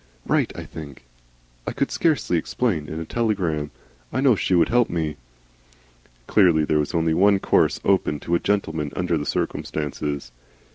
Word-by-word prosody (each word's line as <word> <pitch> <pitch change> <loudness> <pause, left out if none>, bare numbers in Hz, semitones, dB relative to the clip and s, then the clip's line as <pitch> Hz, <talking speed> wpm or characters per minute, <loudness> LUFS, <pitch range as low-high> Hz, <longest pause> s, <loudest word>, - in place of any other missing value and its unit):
Write, - - +1
I - - -5
think. 70 -6 -10 0.6
I - - -2
could - - -1
scarcely 155 - +1
explain 85 -5 -1
in 80 - -5
a 80 - -5
telegram. 90 -10 -1 0.4
I - - -1
know 130 -3 +5
she 95 - +1
would 85 - +4
help 120 0 +3
me." 80 -3 -2 1.1
Clearly 85 - +4
there 75 0 +2
was 75 +3 -2
only 80 -1 +2
one 100 +4 +4
course - - +2
open 95 -6 +2
to 85 - -3
a 85 - +4
gentleman 80 -8 -1
under 90 -2 0
the 75 -2 -2
circumstances. 75 -4 -3
85 Hz, 160 wpm, -23 LUFS, 75-100 Hz, 1.1 s, know